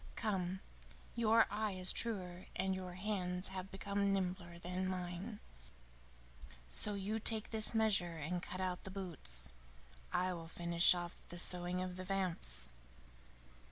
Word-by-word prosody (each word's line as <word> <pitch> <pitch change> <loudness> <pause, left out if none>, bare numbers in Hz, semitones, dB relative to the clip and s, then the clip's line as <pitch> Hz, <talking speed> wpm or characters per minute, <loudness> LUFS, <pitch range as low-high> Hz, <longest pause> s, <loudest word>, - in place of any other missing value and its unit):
Come, 190 -3 -1 0.5
your 225 -1 +5
eye 215 -1 0
is 185 -1 +5
truer 185 -5 -2
and 190 0 +1
your 185 -1 -4
hands 185 -2 -1
have 190 0 -5
become 200 +1 0
nimbler 180 -3 -1
than 180 +2 -2
mine, 185 +4 -3 1.3
so 200 - +2
you 205 +3 -1
take 220 0 +3
this 220 0 +2
measure 195 -7 +3
and 175 +4 -2
cut 185 - -5
out 185 -1 -1
the - - -6
boots. 150 - 0 0.6
I 185 +1 +2
will 165 -2 -6
finish 170 +1 +4
off 175 0 -5
the 175 - -6
sewing 180 +1 +2
of 185 0 -5
the 185 - -4
vamps." 175 - -1
185 Hz, 140 wpm, -38 LUFS, 175-200 Hz, 1.3 s, your